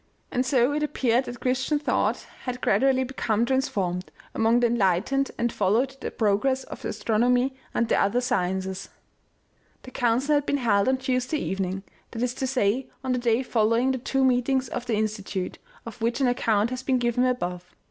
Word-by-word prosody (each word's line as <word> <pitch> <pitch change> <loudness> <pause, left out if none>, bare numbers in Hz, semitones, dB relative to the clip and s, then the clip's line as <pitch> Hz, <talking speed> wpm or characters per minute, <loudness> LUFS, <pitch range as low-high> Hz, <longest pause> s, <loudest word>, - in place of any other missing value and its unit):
And 250 - +1
so 255 +1 +2
it 300 - -1
appeared 260 -4 +1
that 245 -1 -8
Christian 260 +4 +1
thought 295 - 0 0.2
had 250 -1 -3
gradually 260 0 +3
become 235 -3 0
transformed, 235 -9 -1 0.2
among 225 +2 +3
the 245 - +3
enlightened, 235 +4 +1
and 235 0 0
followed 230 +7 +1
the - - -3
progress 235 +5 +1
of - - -10
astronomy 245 +4 +1 0.2
and 235 - +2
the - - +2
other 200 +5 +2
sciences. 190 -4 -2 0.9
The 255 - -10
council 250 +5 +1
had 290 -1 +1
been 285 - +1
held 205 -6 +2
on 260 - +2
Tuesday 255 +2 -1
evening, 190 -5 -3 0.3
that 230 0 -4
is 245 -1 0
to 265 - -3
say 250 -1 +1 0.2
on 260 - -1
the 250 - +1
day 240 +1 +1
following 230 +2 +2
the 260 - -2
two 270 +2 +1
meetings 255 0 +1
of 245 0 -5
the 230 - +1
Insti 215 -1 -1
tute, 190 -1 -4 0.3
of 230 0 -9
which 235 +3 0
an 270 - +3
account 230 -2 +1
has 255 0 -3
been 260 -1 +1
given 245 0 +1
above. 180 -9 -1
245 Hz, 185 wpm, -25 LUFS, 215-260 Hz, 0.9 s, gradually